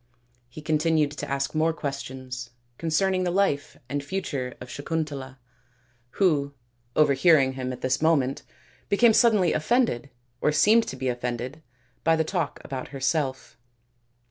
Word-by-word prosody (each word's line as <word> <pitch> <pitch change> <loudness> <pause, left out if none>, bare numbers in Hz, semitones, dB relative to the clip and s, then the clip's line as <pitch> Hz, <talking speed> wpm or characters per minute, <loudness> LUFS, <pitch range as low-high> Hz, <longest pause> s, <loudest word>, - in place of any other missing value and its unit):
He 150 +5 -10
continued 155 -1 +2
to 150 - -6
ask 140 0 -1
more 160 +1 +2
questions 130 -4 -6 0.3
concerning 185 +3 +1
the 180 - 0
life 175 -6 0
and 145 0 -3
future 140 -7 -3
of 125 - -9
Sakuntala, 145 -3 -4 0.8
who, 145 -7 +2 0.4
overhearing 140 -1 +5
him 130 -1 -4
at 125 - -7
this 130 +1 0
moment, 145 -5 +2 0.5
became 225 +3 +5
suddenly 210 -7 +4
offended, 155 - +1 0.3
or 150 - +3
seemed 220 +9 +4
to - - -5
be 130 0 -3
offended, 125 +4 -3 0.4
by 165 0 +4
the 160 - +1
talk 165 -2 -2
about 130 -2 -5
herself. 135 -1 -2
145 Hz, 135 wpm, -26 LUFS, 130-165 Hz, 0.8 s, overhearing